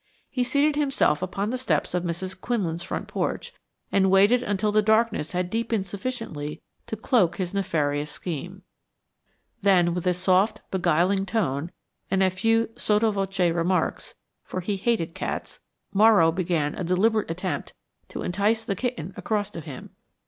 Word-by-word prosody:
He 255 Hz, -2 st, 0 dB
seated 285 Hz, +4 st, +2 dB
himself 275 Hz, -, +2 dB
upon 195 Hz, +3 st, -2 dB
the 255 Hz, -, -2 dB
steps 260 Hz, -, 0 dB
of 180 Hz, -, +1 dB
Mrs. 185 Hz, +2 st, -4 dB
Quinlan's 180 Hz, -9 st, -1 dB
front -, -, -4 dB
porch -, -, -3 dB, 0.4 s
and 190 Hz, -1 st, +3 dB
waited 200 Hz, +6 st, +5 dB
until 205 Hz, -2 st, 0 dB
the 215 Hz, +1 st, +4 dB
darkness 220 Hz, -6 st, +2 dB
had 180 Hz, 0 st, -1 dB
deepened 225 Hz, -3 st, -1 dB
sufficiently 195 Hz, -8 st, -5 dB, 0.3 s
to -, -, -3 dB
cloak 215 Hz, -5 st, +2 dB
his 180 Hz, -1 st, -3 dB
nefarious 150 Hz, -6 st, 0 dB
scheme. 180 Hz, +4 st, -6 dB, 1.0 s
Then, 180 Hz, -4 st, +4 dB
with 180 Hz, +1 st, 0 dB
soft 185 Hz, +3 st, +2 dB
beguiling 190 Hz, +2 st, +2 dB
tone 170 Hz, -8 st, -1 dB, 0.4 s
and 190 Hz, 0 st, +2 dB
a 185 Hz, -, +3 dB
few 225 Hz, +4 st, +2 dB
sotto 215 Hz, +1 st, +2 dB
voce 195 Hz, -3 st, 0 dB
remarks, 175 Hz, +2 st, -1 dB, 0.3 s
for 185 Hz, -, -5 dB
he 200 Hz, +3 st, -1 dB
hated 195 Hz, -5 st, 0 dB
cats -, -, -5 dB, 0.3 s
Morrow 205 Hz, -5 st, +6 dB
began 165 Hz, -4 st, 0 dB
a -, -, -4 dB
deliberate 200 Hz, +5 st, +2 dB
attempt 180 Hz, +3 st, -3 dB, 0.4 s
to -, -, -5 dB
entice 210 Hz, +5 st, +1 dB
the 200 Hz, -4 st, -1 dB
kitten 195 Hz, -6 st, -3 dB
across 210 Hz, -2 st, -2 dB
to 170 Hz, -, -7 dB
him. 145 Hz, -5 st, -9 dB
190 Hz, 150 wpm, -25 LUFS, 175-220 Hz, 1.0 s, Morrow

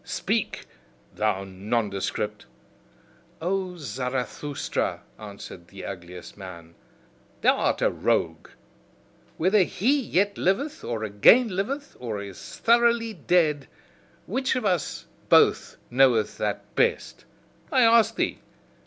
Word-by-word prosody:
Speak, -, -, -2 dB, 0.5 s
thou 105 Hz, -3 st, 0 dB
nondescript!" 105 Hz, -, -3 dB, 0.9 s
"O 185 Hz, +1 st, -2 dB
Zarathustra," 130 Hz, +1 st, -3 dB, 0.2 s
answered 100 Hz, -4 st, -10 dB
the 95 Hz, 0 st, -10 dB
ugliest 90 Hz, -1 st, -9 dB
man, 85 Hz, -4 st, -10 dB, 0.7 s
"thou -, -, +5 dB
art -, -, 0 dB
a -, -, +4 dB
rogue! -, -, -1 dB, 0.9 s
Whether 190 Hz, +5 st, +4 dB
HE 245 Hz, +10 st, +1 dB
yet 200 Hz, -3 st, 0 dB
liveth, 280 Hz, +12 st, 0 dB
or 115 Hz, -2 st, -3 dB
again 110 Hz, -, +5 dB
liveth, 265 Hz, +10 st, -3 dB
or 115 Hz, -4 st, -4 dB
is 100 Hz, -2 st, -9 dB
thoroughly 235 Hz, -1 st, +3 dB
dead 160 Hz, -5 st, +1 dB, 0.6 s
which 260 Hz, +5 st, -1 dB
of 250 Hz, -3 st, -2 dB
us 180 Hz, -7 st, -1 dB, 0.2 s
both -, -, +4 dB
knoweth 125 Hz, -4 st, +3 dB
that -, -, -3 dB
best? 470 Hz, 0 st, 0 dB, 0.5 s
I 260 Hz, -4 st, +4 dB
ask 225 Hz, -1 st, +5 dB
thee. -, -, -1 dB
150 Hz, 110 wpm, -25 LUFS, -, 0.9 s, thou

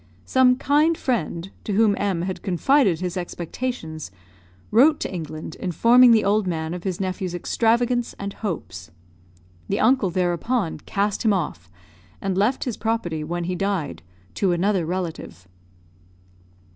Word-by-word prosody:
Some 255 Hz, -1 st, +4 dB
kind 300 Hz, +5 st, +2 dB
friend, 195 Hz, -, -2 dB
to 210 Hz, -, -3 dB
whom 215 Hz, 0 st, +4 dB
M 195 Hz, -5 st, -1 dB
had 185 Hz, 0 st, -4 dB
confided 195 Hz, -, +2 dB
his 180 Hz, 0 st, -3 dB
expectations, 175 Hz, -, -5 dB, 0.6 s
wrote 285 Hz, +8 st, +5 dB
to -, -, -3 dB
England, 160 Hz, -2 st, -6 dB
informing 235 Hz, +7 st, +5 dB
the 225 Hz, -2 st, +5 dB
old 205 Hz, 0 st, +2 dB
man 160 Hz, -1 st, -2 dB
of 180 Hz, +1 st, -7 dB
his 185 Hz, -3 st, -2 dB
nephew's 185 Hz, -1 st, -3 dB
extravagance 235 Hz, +6 st, +1 dB
and 200 Hz, 0 st, -5 dB
hopes. 90 Hz, -, -5 dB, 0.8 s
The -, -, 0 dB
uncle 225 Hz, -3 st, +3 dB
there 175 Hz, 0 st, +1 dB
upon 200 Hz, -3 st, -1 dB
cast 200 Hz, +7 st, -2 dB
him 220 Hz, -3 st, +4 dB
off, 150 Hz, -, -3 dB, 0.5 s
and 195 Hz, -1 st, -2 dB
left 210 Hz, +7 st, +1 dB
his 245 Hz, -5 st, -4 dB
property, 180 Hz, -9 st, -2 dB
when 175 Hz, +3 st, -3 dB
he 180 Hz, +2 st, -2 dB
died, 180 Hz, -, -2 dB, 0.3 s
to 180 Hz, -, +1 dB
another 180 Hz, -1 st, +1 dB
relative. 170 Hz, -, -5 dB
190 Hz, 145 wpm, -23 LUFS, 170-230 Hz, 0.8 s, wrote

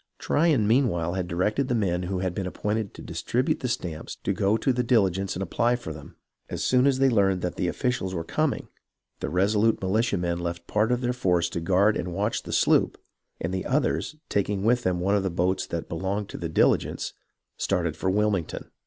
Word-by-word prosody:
Tryon 150 Hz, -8 st, +2 dB
meanwhile 105 Hz, -9 st, +2 dB
had 95 Hz, -2 st, -2 dB
directed 105 Hz, +10 st, 0 dB
the 125 Hz, -, 0 dB
men 90 Hz, -5 st, 0 dB
who 90 Hz, +1 st, -2 dB
had 95 Hz, -2 st, -1 dB
been 95 Hz, 0 st, -3 dB
appointed 105 Hz, +2 st, -2 dB
to -, -, -10 dB
distribute 145 Hz, +6 st, -1 dB
the 130 Hz, -, -2 dB
stamps 90 Hz, -10 st, -4 dB
to -, -, 0 dB
go 100 Hz, +3 st, +2 dB
to 130 Hz, +4 st, +1 dB
the 125 Hz, -, +1 dB
Diligence 95 Hz, -5 st, +1 dB
and 95 Hz, -, -2 dB
apply 120 Hz, +6 st, +1 dB
for 120 Hz, -, -6 dB
them. -, -, -12 dB, 0.3 s
As -, -, -3 dB
soon 130 Hz, +1 st, +4 dB
as 135 Hz, -2 st, +3 dB
they 135 Hz, 0 st, +4 dB
learned 100 Hz, -6 st, +2 dB
that 90 Hz, -, -1 dB
the 90 Hz, -, -1 dB
officials 110 Hz, -3 st, -1 dB
were 85 Hz, -, -2 dB
coming, -, -, -1 dB, 0.5 s
the -, -, -3 dB
resolute 105 Hz, +6 st, +2 dB
militia 105 Hz, +3 st, +1 dB
men 85 Hz, -1 st, -1 dB
left 85 Hz, 0 st, -3 dB
a -, -, -18 dB
part 105 Hz, +3 st, +3 dB
of 125 Hz, 0 st, +1 dB
their 125 Hz, 0 st, 0 dB
force 90 Hz, -8 st, +1 dB
to 85 Hz, -, -3 dB
guard 95 Hz, +5 st, +3 dB
and 85 Hz, 0 st, -3 dB
watch -, -, 0 dB
the -, -, -8 dB
sloop, -, -, +3 dB, 0.4 s
and -, -, -3 dB
the 95 Hz, -, -2 dB
others, 150 Hz, +2 st, 0 dB
taking 100 Hz, -1 st, 0 dB
with 120 Hz, +3 st, +3 dB
them 90 Hz, -5 st, 0 dB
one 100 Hz, +3 st, +2 dB
of 100 Hz, -, +2 dB
the 95 Hz, -, -1 dB
boats 90 Hz, +2 st, 0 dB
that 85 Hz, -1 st, -4 dB
belonged 95 Hz, +4 st, -3 dB
to -, -, -7 dB
the 85 Hz, -, -3 dB
Diligence, 80 Hz, -, +1 dB, 0.4 s
started 85 Hz, -5 st, -1 dB
for 95 Hz, +3 st, -1 dB
Wilmington. 100 Hz, -3 st, -1 dB
95 Hz, 215 wpm, -26 LUFS, 90-120 Hz, 0.5 s, soon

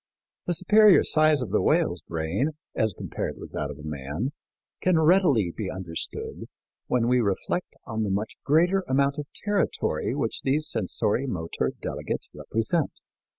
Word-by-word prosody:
The 175 Hz, -, +1 dB
superior 210 Hz, +3 st, +6 dB
size 155 Hz, -3 st, +3 dB
of 105 Hz, -, -6 dB
the 105 Hz, -, +3 dB
whale's -, -, +2 dB
brain, 85 Hz, -, -1 dB, 0.2 s
as 110 Hz, -4 st, 0 dB
compared -, -, -4 dB
with -, -, -10 dB
that 70 Hz, -, -3 dB
of 75 Hz, +1 st, -8 dB
man, 75 Hz, -, -3 dB, 0.5 s
can 180 Hz, -2 st, +3 dB
readily 155 Hz, -, +4 dB
be 105 Hz, -4 st, -3 dB
understood 90 Hz, -3 st, -4 dB, 0.4 s
when 120 Hz, -2 st, +2 dB
we 125 Hz, 0 st, +4 dB
reflect 105 Hz, -, -2 dB
on 110 Hz, 0 st, -3 dB
the 105 Hz, -, 0 dB
much 100 Hz, +3 st, -1 dB
greater 175 Hz, +6 st, +3 dB
amount 140 Hz, +2 st, +2 dB
of 145 Hz, -, -5 dB
territory 205 Hz, -1 st, -1 dB
which -, -, -2 dB
these 150 Hz, +3 st, 0 dB
sensori 110 Hz, +5 st, 0 dB
motor 85 Hz, -8 st, -2 dB
delegates -, -, -4 dB
represent. 115 Hz, +9 st, -1 dB
125 Hz, 150 wpm, -26 LUFS, 95-155 Hz, 0.5 s, superior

